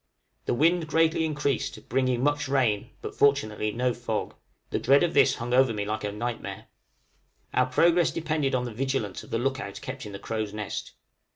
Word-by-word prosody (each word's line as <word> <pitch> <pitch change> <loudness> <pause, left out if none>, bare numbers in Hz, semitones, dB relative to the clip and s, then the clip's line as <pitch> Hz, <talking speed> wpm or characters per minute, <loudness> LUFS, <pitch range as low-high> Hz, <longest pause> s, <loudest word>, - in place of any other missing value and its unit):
The - - +1
wind 165 +4 +3
greatly 160 +1 +2
increased, 145 -4 -2
bringing 130 0 +1
much 145 0 +1
rain, 120 -5 +1
but - - -5
fortunately 110 -7 +2
no 125 +2 0
fog; 120 -3 -3 0.4
the - - 0
dread 140 +4 +4
of 170 - +1
this 135 - +5
hung 120 +1 -4
over 130 -3 +4
me 105 -1 -2
like 110 +1 -3
a 105 - -2
nightmare, 115 +3 -5 0.9
our 130 0 +3
progress 170 +6 +4
depended 155 -4 -1
upon 125 -1 0
the 120 - -5
vigilance 130 -5 -2
of - - -14
the - - 0
look 130 +2 -1
out 100 - -6
kept 130 -3 -6
in - - -8
the 100 - -6
crow's 110 0 -4
nest. 105 -2 -5
130 Hz, 190 wpm, -27 LUFS, 110-140 Hz, 0.9 s, this